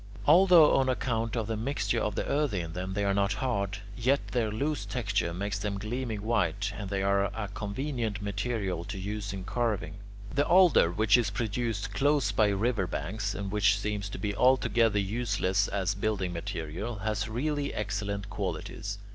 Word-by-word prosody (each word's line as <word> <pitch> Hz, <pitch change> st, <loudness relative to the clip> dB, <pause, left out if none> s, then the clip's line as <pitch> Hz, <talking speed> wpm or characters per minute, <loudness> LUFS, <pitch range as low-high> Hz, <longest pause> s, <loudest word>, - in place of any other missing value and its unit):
Although 170 Hz, 0 st, +7 dB
on 130 Hz, -1 st, +2 dB
account 115 Hz, -3 st, -1 dB
of 115 Hz, -2 st, -1 dB
the 110 Hz, +1 st, -2 dB
mixture 120 Hz, +1 st, -1 dB
of 105 Hz, -3 st, -1 dB
the -, -, -1 dB
earthy 140 Hz, -9 st, 0 dB
in 85 Hz, -1 st, -5 dB
them 95 Hz, +1 st, -4 dB
they 100 Hz, -1 st, 0 dB
are 100 Hz, -, +2 dB
not 100 Hz, 0 st, +1 dB
hard, 105 Hz, -3 st, -1 dB, 0.2 s
yet 130 Hz, +5 st, +1 dB
their 120 Hz, -4 st, 0 dB
loose 145 Hz, +8 st, -1 dB
texture 105 Hz, -7 st, -1 dB
makes 100 Hz, +3 st, -3 dB
them 100 Hz, -1 st, -2 dB
gleaming 110 Hz, 0 st, -3 dB
white, 100 Hz, -3 st, 0 dB
and 100 Hz, -1 st, -5 dB
they 95 Hz, -1 st, -1 dB
are 100 Hz, 0 st, +2 dB
a 105 Hz, 0 st, -4 dB
convenient 110 Hz, 0 st, -3 dB
material 100 Hz, -3 st, -2 dB
to 100 Hz, -, -6 dB
use 100 Hz, +1 st, -4 dB
in 95 Hz, -1 st, -5 dB
carving. 110 Hz, -2 st, -2 dB, 0.3 s
10. -, -, -10 dB
The 145 Hz, -, +3 dB
alder, 175 Hz, -, +6 dB
which 105 Hz, +4 st, +4 dB
is 115 Hz, -5 st, +1 dB
produced 105 Hz, -1 st, -2 dB
close 145 Hz, +6 st, +2 dB
by 110 Hz, -, +3 dB
river 100 Hz, 0 st, 0 dB
banks, 100 Hz, +6 st, -3 dB
and 100 Hz, 0 st, -4 dB
which 105 Hz, 0 st, +3 dB
seems 105 Hz, 0 st, -3 dB
to -, -, -6 dB
be 100 Hz, -1 st, -2 dB
altogether 120 Hz, -3 st, +3 dB
useless 100 Hz, -2 st, 0 dB
as 95 Hz, -1 st, -1 dB
building 95 Hz, -2 st, -1 dB
material, 85 Hz, +3 st, -4 dB
has 110 Hz, +1 st, -1 dB
really 145 Hz, +5 st, -1 dB
excellent 100 Hz, -1 st, -3 dB
qualities. 100 Hz, +2 st, -4 dB
105 Hz, 180 wpm, -29 LUFS, 100-120 Hz, 0.3 s, Although